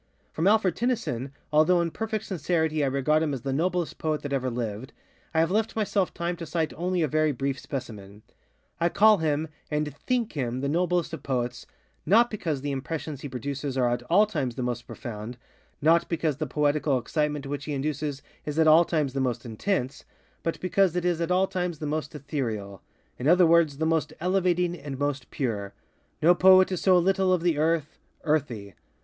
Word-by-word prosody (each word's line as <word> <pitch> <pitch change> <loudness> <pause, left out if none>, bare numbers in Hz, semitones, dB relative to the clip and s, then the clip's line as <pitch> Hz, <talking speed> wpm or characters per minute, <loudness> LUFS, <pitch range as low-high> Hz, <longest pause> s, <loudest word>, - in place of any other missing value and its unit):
From 165 +4 0
Alfred 200 -4 +3
Tennyson, 220 - -2 0.2
although 160 +4 +5
in 170 -1 0
perfect 220 +3 -3
sincerity 160 -3 0
I - - +2
regard 140 +3 +2
him 150 -3 0
as 125 - -8
the 135 - -2
noblest 175 +3 -1
poet 155 -1 -1
that 145 -1 -4
ever 130 -1 0
lived, 120 +1 -4 0.4
I 160 - +1
have 165 - +1
left 220 +2 0
myself 205 -3 0
time 170 +1 -3
to 165 - -6
cite 160 -3 -1
only 180 0 0
a - - +2
very 155 +2 +2
brief 135 +1 -2
specimen. 105 -6 -7 0.6
I 170 - +2
call 215 +2 +5
him, 155 0 0 0.2
and 150 -1 -1
_think 245 -3 +1
_him 130 -3 -3
the 140 - -1
noblest 175 +2 0
of 160 - -5
poets, 125 -2 -3 0.4
_not 230 +7 +5
_because 165 -10 -2
the 145 +1 -2
impressions 145 +1 -4
he 145 - -6
produces 135 +2 -4
are 125 -2 +2
at 120 - -1
_all 200 +5 +6
_times 140 - -2
the 130 - -3
most 120 -1 -3
profoundŌĆö_not 115 0 -7 0.7
_because 160 -4 -1
the 155 - -2
poetical 145 0 +1
excitement 150 +2 -2
which 140 0 -4
he 150 - -3
induces 145 0 -3 0.2
is 150 0 -5
at 160 - +4
_all 160 +2 +6
_times 150 -5 +1
the 135 - -1
most 125 -2 -1
intenseŌĆöbut 135 - -4
because 185 -1 +2
it 180 -1 -1
is 175 -2 +1
at 170 - -1
all 185 +1 +3
times 180 -3 -3
the 150 - -5
most 150 +1 -3
etherealŌĆöin 115 - -4 0.5
other 180 +2 +6
words, 165 -4 +4
the 160 - 0
most 160 -1 0
elevating 180 -1 +1
and 145 -5 -7
most 140 -2 -2
pure. 105 -7 -3 0.5
No 170 +3 +7
poet 185 +1 +6
is 185 - -2
so 185 -2 +5
little 190 +1 +2
of 180 -2 +2
the 170 -4 +1
earth, 160 -1 0 0.2
earthy. 125 - -1
155 Hz, 190 wpm, -26 LUFS, 135-175 Hz, 0.7 s, No